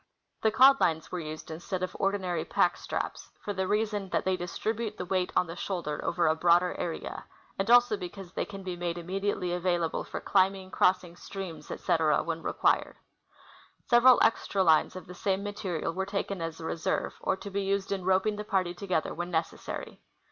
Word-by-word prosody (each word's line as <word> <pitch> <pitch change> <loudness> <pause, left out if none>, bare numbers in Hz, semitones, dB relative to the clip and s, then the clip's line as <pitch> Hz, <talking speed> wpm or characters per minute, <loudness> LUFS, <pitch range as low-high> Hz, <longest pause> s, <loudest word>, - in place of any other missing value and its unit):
The 220 - +4
cod 270 +5 +6
lines 160 -1 +1
were 180 - -2
used 155 0 -7
instead 175 +3 -4
of 185 - -3
ordinary 190 -3 0
pack - - +2
straps, - - -4
for 205 - -4
the 190 -1 -1
reason 210 -2 0
that - - 0
they 190 0 +2
dis 175 -1 -5
tribute 220 -1 -2
the 180 - -4
weight 185 0 0
on - - +4
the 165 0 -7
shoulder 175 -5 -3
over 170 0 +1
a 155 - +4
lu'oader 175 +2 +4
area, 165 - -4 0.3
and 195 +3 0
also 245 -2 +6
because 185 0 -8
they - - -1
can 195 -1 -9
be 185 -1 -4
made 175 -1 -3
immediately 190 +1 -2
availal:»le 175 -2 0
for - - -5
climbing, 190 -1 +1
crossing 180 -2 +2
streams, 175 -5 -7
etc., 160 -4 +1
when 165 0 -3
required. - - +1 0.9
Several 245 +1 +7
extra 200 -3 +2
lines 160 -1 +4
of 185 - -7
the 180 - -10
same 195 +2 -1
material 195 -6 -3
were 190 +2 -2
also 200 - -12
taken 195 -2 -3
as 165 -1 -4
a 160 - -7
reserve, 160 0 -2
or - - +1
to 200 - -8
be 200 +1 -1
used 195 0 -1
in 195 -2 -1
roping 190 +3 +2
the 210 - -4
party 190 -4 0
together 180 -3 -1
when 175 +1 -4
necessary. 160 -1 -4
185 Hz, 195 wpm, -29 LUFS, 175-200 Hz, 0.9 s, Several